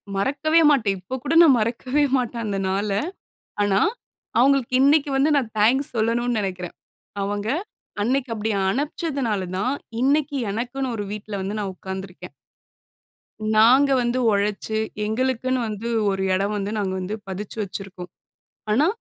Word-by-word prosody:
மறக்கவே 290 +10 +2
மாட்டேன். 220 -9 +2
இப்ப 255 +9 -5
கூட 295 +3 -1
நான் 280 -7 +7
மறக்கவே 255 +6 0
மாட்டேன் 235 -2 -2
அந்த 200 -2 -2
நாள. 200 +2 -1 0.7
ஆனா, 200 -1 +2 0.6
அவங்களுக்கு 265 -1 +3
இன்னைக்கு 285 +1 +4
வந்து 285 +3 +3
நான் 235 -5 -1
தேங்க்ஸ் 250 +6 +3
சொல்லணும்னு 230 +1 +1
நெனைக்றேன். 185 -3 -4 0.5
அவங்க, 205 +1 -3 0.6
அன்னைக்கு 255 +1 0
அப்டி 215 +1 -2 0.2
அனுப்ச்சதுனால 270 - -2
தான், 250 +7 0 0.3
இன்னைக்கு 285 +2 +2 0.2
எனக்குன்னு 245 +3 -3
ஒரு 205 - -3
வீட்ல 210 0 -8
வந்து 200 +3 -3
நான் 195 -2 -3
உட்கார்ந்துருக்கேன். 190 -1 -8 1.2
நாங்க 255 +6 +6
வந்து 240 +1 0
ஒழச்சு, 205 +2 -1 0.3
எங்களுக்குன்னு 255 +3 0
வந்து 215 +2 -5 0.2
ஒரு 190 0 -2
எடம் 200 +3 0
வந்து 200 +1 -3
நாங்க 190 -2 -1
வந்து, 190 +4 -3
பதிச்சு 195 +3 -6
வெச்சிருக்கோம். 185 -2 -7 0.6
ஆனா, 285 +9 +4
225 Hz, 135 wpm, -23 LUFS, 200-265 Hz, 1.2 s, நான்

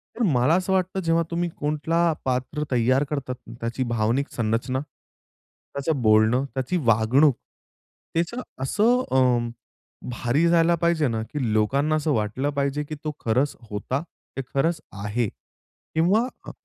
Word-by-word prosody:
तर 245 - -5
मला 145 - +3
असं 185 +1 0
वाटतं, 185 +1 0
जेव्हा 165 -1 +2
तुम्ही 170 0 0
कुठलं 160 +3 +1
पात्र 130 +4 -1
तयार 130 +3 +3
करतात 135 -4 -3
ना, - - -9
त्याची 115 +3 -2
भावनिक 115 +5 +1
संरचना, 115 +3 -1
त्याचं 140 0 -7
बोलणं, 110 +4 +4
त्याची 135 +7 -1
वागणूक, 120 +5 +4 0.8
त्याचं 175 +10 -1 0.2
असं 235 - +3
अ, 125 -3 +3 0.6
भारी 125 +7 +1
जायला 170 0 +4
पाहिजे 170 -2 +2
ना, 115 -2 -1
की 125 -1 -3
लोकांना 140 +8 +2
असं 155 0 0
वाटलं 110 +6 -1
पाहिजे, 140 +1 -1
की 155 +1 -6
तो 155 - -2
खरंच 125 +5 +1 0.2
होता, 115 +7 -2 0.4
ते 135 - 0
खरंच 155 +3 +1 0.2
आहे. 105 +2 0 0.7
किंवा 195 +10 +3 0.2
अ, - - -5
140 Hz, 140 wpm, -24 LUFS, 120-165 Hz, 0.8 s, बोलणं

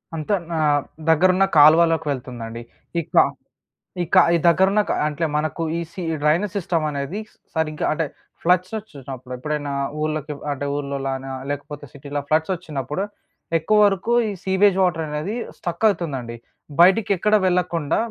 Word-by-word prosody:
అంత 155 +5 -4 0.2
నా 160 - -1 0.5
దగ్గరున్న 185 +4 +4
కాలువలోకి 160 +2 +6
వెళ్తుందండి. 120 -3 -6 0.4
ఈ - - 0
కా - - +7 0.8
ఈ - - +1
క - - +7 0.2
ఈ - - +4
దగ్గరున్న 190 +4 +4
క - - +2 0.2
అంటే 155 +2 -1
మనకు 155 +2 -2 0.2
ఈ - - -1
సి 185 - -7 0.2
డ్రైనేజ్ 170 +6 +2
సిస్టమ్ 170 -4 -1
అనేది 145 +7 -4 0.4
సరిగ్గా 155 -2 -1
అంటే 160 0 -1 0.4
ఫ్లడ్స్ 180 +2 +2
ఒచ్చినప్పుడు, 135 - -9
ఎప్పుడైనా 145 +1 -3 0.3
ఊర్లోకి 155 -1 -2 0.2
అంటే 145 0 -3
ఊర్లోలానా 135 -2 -3 0.2
లేకపోతే 145 +1 -5
సిటీలో 145 +1 -5
ఫ్లడ్స్ 160 +4 +2
ఒచ్చినప్పుడు 150 0 -4 0.5
ఎక్కువ 210 +6 +1
వరకు 195 +4 -1 0.2
ఈ - - -2
సీవేజ్ 190 0 +3
వాటరనేది 160 +2 -1 0.2
స్ట్రక్ 175 +4 -2
అతుందండి. 130 -10 -5 0.5
బయటికెక్కడ 200 +2 +4
వెళ్ళకుండా, 175 -4 +1
155 Hz, 135 wpm, -22 LUFS, 145-180 Hz, 0.8 s, కా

